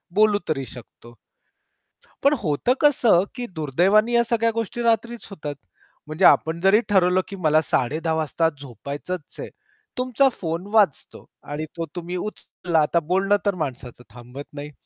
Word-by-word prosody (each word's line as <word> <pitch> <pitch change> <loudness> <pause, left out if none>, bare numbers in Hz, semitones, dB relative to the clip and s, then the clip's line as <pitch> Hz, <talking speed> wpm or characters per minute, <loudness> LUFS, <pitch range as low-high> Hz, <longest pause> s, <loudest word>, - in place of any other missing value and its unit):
बोलू 210 -1 +4
तरी 135 -4 -1
शकतो. 120 -1 -13 1.1
पण 280 +2 +5
होतं 155 - +1
कसं, 245 -11 +4
की 245 - -4
दुर्दैवाने 185 - +2
या 235 0 +4
सगळ्या 230 -1 +2
गोष्टी 230 +2 -4
रात्रीच 235 0 0
होतात. 150 -7 -6 0.5
म्हणजे 155 +5 +1
आपण 160 +1 +4
जरी 195 +3 +5
ठरवलं, 185 -2 +3
की 200 - -7
मला 155 -2 +3
10:30 155 +4 -1
वाजता 160 +1 0
झोपायचंच 145 - -7
आहे. - - -6 0.5
तुमचा 255 +2 +2
फोन 170 +1 -3
वाजतो 205 -10 +1 0.2
आणि 150 +2 -5
तो 165 - -2
तुम्ही 175 +1 -5
उचलला 180 -3 -3
आता 170 +3 +2
बोलणं 190 +5 +1
तर 200 -2 +1
माणसाचं 125 -6 -6
थांबत 125 +5 -10
नाही. 145 0 -7
175 Hz, 145 wpm, -23 LUFS, 150-215 Hz, 1.1 s, पण